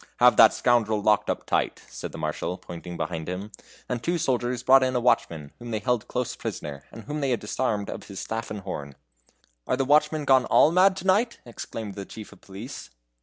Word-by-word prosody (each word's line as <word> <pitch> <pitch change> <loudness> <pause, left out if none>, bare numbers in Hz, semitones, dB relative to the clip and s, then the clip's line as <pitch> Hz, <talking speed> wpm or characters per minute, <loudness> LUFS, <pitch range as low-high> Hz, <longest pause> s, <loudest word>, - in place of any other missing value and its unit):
"Have 125 0 +6
that 110 - +9
scoundrel 110 -3 +2
locked 105 0 +2
up - - -2
tight," - - -1
said - - -7
the - - -8
Marshal, 90 - -3
pointing 90 -1 -8
behind 80 +1 -4
him 95 +4 -5 0.4
and 125 -2 -3
two 175 +5 0
soldiers 125 -4 -1
brought 135 +1 +7
in 130 0 +1
a - - +3
watchman, 85 -11 +1
whom 120 0 -8
they 110 - -1
held 125 +1 -1
close 125 -1 -2
prisoner, 70 -1 -6
and 115 - -10
whom 150 +7 -4
they 140 - 0
had 120 -4 +1
disarmed 105 -1 -2
of - - -6
his 100 -2 -8
staff 115 +1 -4
and 105 -1 -5
horn. 70 -6 -6 0.7
"Are 130 - +1
the 135 - +1
watchmen 150 +1 +3
gone 130 -2 +5
all 155 - +5
mad 185 +2 +4
to 190 - -6
night?" 215 +5 +2
exclaimed 115 -3 -7
the 100 0 -7
chief 110 +1 -10
of - - -17
police. 100 +8 -9
120 Hz, 215 wpm, -26 LUFS, 100-130 Hz, 0.7 s, that